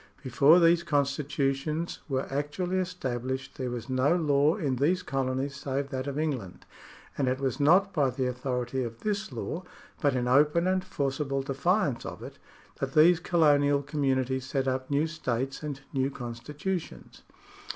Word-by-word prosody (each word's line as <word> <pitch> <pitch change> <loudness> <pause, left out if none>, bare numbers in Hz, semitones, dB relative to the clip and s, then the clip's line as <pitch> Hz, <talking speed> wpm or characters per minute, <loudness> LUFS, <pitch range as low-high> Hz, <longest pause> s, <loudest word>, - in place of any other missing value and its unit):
Be 130 - -6
fore 145 +7 +6
these 170 0 +5
constitutions 145 +1 -1
were 135 -1 0
actually 150 +7 -2
established, 130 -7 -4
there 130 -1 -2
was 120 0 -5
no 130 +5 +2
law 150 -1 +3
in 145 -11 -1
these 175 +8 +1
colonies 135 +1 -2
save 140 0 -3
that 130 0 -4
of 140 0 -3
England, 135 - -3 0.5
and 135 - +2
it 130 +1 0
was 135 +1 -2
not 185 +7 +4
by 145 -5 +2
the 130 +1 -2
authority 125 0 -2
of 115 -1 -7
this 210 0 -2
law, 170 - -4 0.4
but 145 -4 +2
in 125 -1 0
open 150 +6 +4
and 185 0 +1
forcible 135 -2 -2
defiance 140 - 0
of - - -7
it, - - -10 0.4
that 135 0 -3
these 160 +2 +6
colonial 145 -5 +3
communities 130 -3 -1
set 135 0 -1
up 130 0 -1
new 145 +2 +2
states 135 -5 -3
and 145 -3 -5
new 135 0 +1
constitutions. 145 +8 -6
140 Hz, 160 wpm, -28 LUFS, 130-155 Hz, 0.5 s, fore